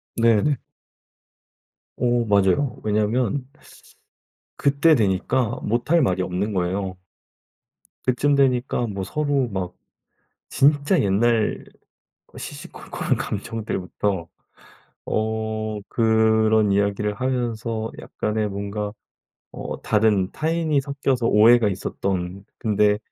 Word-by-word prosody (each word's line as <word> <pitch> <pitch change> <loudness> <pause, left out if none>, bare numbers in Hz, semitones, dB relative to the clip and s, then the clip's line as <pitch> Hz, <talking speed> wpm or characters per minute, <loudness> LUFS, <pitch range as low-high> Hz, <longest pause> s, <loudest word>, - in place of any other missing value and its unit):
네네. 115 +5 +3 1.4
어. 120 -1 +1
맞아요. 100 +5 +2
왜냐면 110 +5 0 1.1
그때 145 +3 +4
되니까 110 +2 +1
못 120 +6 -1
할 170 -1 +5
말이 95 -7 +1
없는 90 +4 -2
거예요. 95 0 -2 1.1
그쯤 130 +3 +2
되니까 125 -3 +2
뭐 100 -3 -4
서로 145 +2 0
막 95 -4 -4 0.7
진짜 145 +5 +3
옛날 110 +3 +1 0.7
시시콜콜한 - - -4
감정들부터 100 -4 -3 0.8
어 110 0 -2
그런 110 -2 +3
이야기를 100 +1 0
하면서 115 -2 -2
약간의 105 0 -2
뭔가 100 +1 -4 0.6
어 - - -6
다른 105 -3 +2
타인이 160 -2 0
섞여서 135 -3 -1
오해가 115 +1 +6
있었던 95 -1 -3
근데 105 -1 +2
110 Hz, 200 characters per minute, -23 LUFS, 100-125 Hz, 1.4 s, 오해가